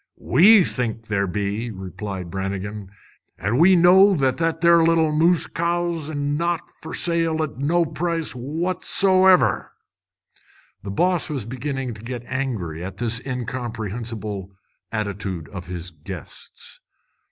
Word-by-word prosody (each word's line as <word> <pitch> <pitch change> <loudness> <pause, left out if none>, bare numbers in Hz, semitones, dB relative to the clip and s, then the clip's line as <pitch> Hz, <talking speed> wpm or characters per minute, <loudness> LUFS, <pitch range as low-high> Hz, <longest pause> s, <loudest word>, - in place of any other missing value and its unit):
"We 195 - +6
think 115 -6 -3
ther' 100 -3 0
be," 100 +5 -2
replied 95 -2 -6
Brannigan, 95 +1 -4 0.5
"an' 105 +8 -1
we 185 +3 +7
know 190 +3 +6
that 135 -3 0 0.2
there 170 0 +5
little 165 -1 +3
moose 165 +3 +3
cow's 170 -2 -2
our'n 155 - -4
an' 145 0 -1
not 170 0 -2
fer 160 - -6
sale 165 -2 +1
at 145 -4 -6
no 165 +5 +2
price, 165 +1 -2
what 160 +9 -3
so 190 -1 +4
ever!" 185 -1 +3 1.1
The 100 - -7
boss 175 - +1
was 135 -8 -3
beginning 130 +1 -4
to 105 - -12
get 120 +1 -6
angry 110 - -3
at 95 - -7
this 120 0 -1
incomprehensible 115 -5 -5 0.4
attitude 100 -6 -4
of 90 -3 -8
his 90 0 -6
guests. 80 +1 -10
130 Hz, 135 wpm, -22 LUFS, 100-165 Hz, 1.1 s, we